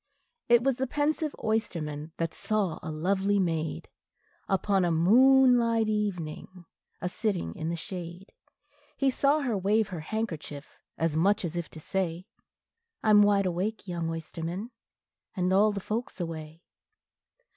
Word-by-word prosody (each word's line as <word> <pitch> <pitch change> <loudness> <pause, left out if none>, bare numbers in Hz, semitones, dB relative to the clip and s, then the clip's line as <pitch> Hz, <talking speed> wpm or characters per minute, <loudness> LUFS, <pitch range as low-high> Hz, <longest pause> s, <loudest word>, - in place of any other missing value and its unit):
It 240 0 +6
was 270 -2 +1
the 265 0 -1
pensive 295 +2 -1
oysterman 165 -9 -2
that 165 -1 -2
saw 205 -6 -1
a 160 - -6
lovely 190 +6 +1
maid, 160 - -1 0.6
Upon 195 0 +2
a 175 - +2
moonlight 235 +4 +5
evening, 185 -4 -3 0.4
a 180 - -1
sitting 180 - -2
in 160 - -4
the 170 - -1
shade; 175 +2 -8 0.6
He 275 -1 +2
saw 285 +4 +2
her 250 -6 0
wave 205 +2 +1
her 180 -4 -5
handkerchief, 160 -6 -5 0.2
as 165 -2 0
much 195 +4 +2
as 170 0 -4
if 175 -1 -3
to 160 - -10
say, 180 +1 -2 0.8
"I 215 - +4
'm 210 0 +8
wide 205 -1 +4
awake, 190 +4 -2
young 170 -2 -2
oysterman, 165 +6 -5 0.6
and 185 -1 +1
all 210 +3 +5
the 200 - -3
folks 215 +3 -4
away." 165 -1 -6
190 Hz, 145 wpm, -28 LUFS, 165-220 Hz, 0.8 s, m